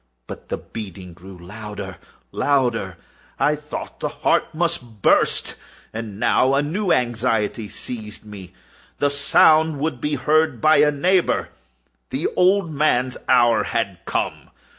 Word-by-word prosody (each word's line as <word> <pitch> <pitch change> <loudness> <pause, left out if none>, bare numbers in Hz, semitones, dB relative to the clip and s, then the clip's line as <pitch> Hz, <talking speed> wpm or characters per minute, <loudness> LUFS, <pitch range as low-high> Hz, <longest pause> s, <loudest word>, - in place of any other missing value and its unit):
But - - -10
the - - -2
beating 95 -5 -9
grew 90 +2 -13
louder, 100 +1 -8 0.3
louder! 120 -10 0 0.4
I 150 - +2
thought 150 0 -8
the - - -2
heart - - +1
must 130 - -3
burst. - - +2 0.4
And 110 -2 -6
now 130 +4 +3
a 140 - +2
new 185 +6 -1
anxiety 115 -3 0
seized 110 0 -7
me—the 105 +7 -6
sound 155 +2 +4
would 140 -4 -3
be 150 0 -1
heard 150 0 +1
by 155 +6 +5
a 150 +1 +5
neighbour! 175 +5 +1 0.6
The 135 - -3
old 185 -1 +3
man's 130 -4 +1
hour 120 -3 +4
had 95 -3 -2
come! - - -3
125 Hz, 130 wpm, -21 LUFS, 105-150 Hz, 0.6 s, by